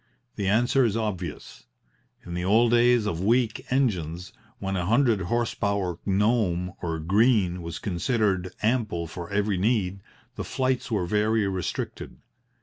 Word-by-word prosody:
The 100 -2 -2
answer 120 +6 +3
is 115 -2 +1
obvious. 95 -8 -5 0.6
In 85 - -7
the 90 0 -2
old 115 +5 +4
days 120 -1 +4
of 85 -5 -2
weak 115 +1 +1
engines, 90 - -1 0.2
when 95 -3 -3
a 90 -2 -1
hundred 115 -2 +3
horse 120 +6 -1
power 100 -4 -1
Gnome 95 -3 +1
or 85 -2 -2
Green 95 +1 +2
was 85 -1 -6
considered 95 -1 0
ample 110 -7 0
for 85 +1 -7
every 100 -2 0
need, 100 -3 0 0.4
the - - -3
flights 130 -1 -1
were 105 -6 0
very 105 +2 +1
restricted. 95 -2 -4
100 Hz, 145 wpm, -26 LUFS, 90-115 Hz, 0.6 s, old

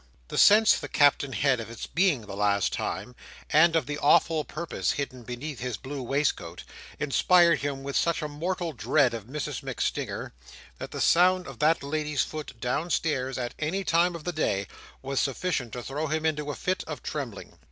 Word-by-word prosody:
The - - -5
sense 215 +1 +7
the - - -6
Captain 145 -1 +3
had 130 +2 +2
of 115 - -6
its 115 - -7
being 170 -8 +2
the 105 -2 -8
last 100 -1 +1
time, 125 - -4 0.4
and 165 +2 +5
of 160 -5 +2
the 145 +2 -4
awful 160 +1 +4
purpose 170 +3 -2
hidden 130 -3 -4
beneath 125 +4 -6
his 125 -3 -3
blue 135 +4 -6
waistcoat, 140 +4 -1 0.4
inspired 170 +3 +4
him 140 -1 -3
with 140 0 -5
such 170 -2 +1
a - - -1
mortal 170 +3 -3
dread 125 +1 +2
of 115 -3 -6
Mrs 145 +5 -4
MacStinger, - - -3 0.5
that - - -6
the - - -5
sound 180 +1 +4
of 135 -7 -10
that 155 +1 +3
lady's 150 0 -1
foot 150 -6 -7
downstairs 135 0 -1
at 120 -1 -3
any 175 +6 -1
time 170 0 +2
of 165 - -8
the 175 - -3
day, 100 -11 0 0.4
was 135 0 -1
sufficient 135 -3 -1
to 125 - -5
throw 150 +4 -3
him 155 +1 -1
into 150 -2 -1
a 145 - -3
fit 185 +1 -2
of - - -6
trembling. - - -6
145 Hz, 185 wpm, -27 LUFS, 130-165 Hz, 0.5 s, sense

